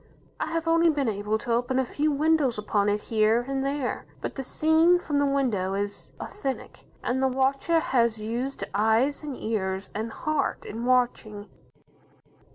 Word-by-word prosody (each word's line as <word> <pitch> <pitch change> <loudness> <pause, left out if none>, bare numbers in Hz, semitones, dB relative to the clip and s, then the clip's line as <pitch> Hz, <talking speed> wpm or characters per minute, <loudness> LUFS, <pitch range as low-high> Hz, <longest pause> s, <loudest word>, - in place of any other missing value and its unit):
I - - -1
have 330 0 -2
only 330 +1 +4
been 290 -4 0
able 210 0 -1
to 235 +2 -2
open 245 +2 0
a 260 - +2
few 300 +5 0
windows 295 -4 +2
upon 210 -1 +1
it 205 +1 0
here 225 +2 +2
and 270 0 -1
there. 275 -2 -2
But - - -4
the 270 - -4
scene 320 +6 +4
from 295 -5 -1
the 285 - +2
windows 215 -9 0
is 205 0 -6
authentic, 270 -10 -5 0.2
and 260 +2 0
the 265 - +3
watcher 270 +5 +1
has 235 -7 +1
used 235 +5 -3
eyes, 220 +7 +2
and 290 -4 -6
ears, 190 -3 -3
and 220 +2 -3
heart, 310 +1 -2
in 230 +3 -5
watching. 240 -4 0
255 Hz, 165 wpm, -26 LUFS, 220-285 Hz, 0.2 s, only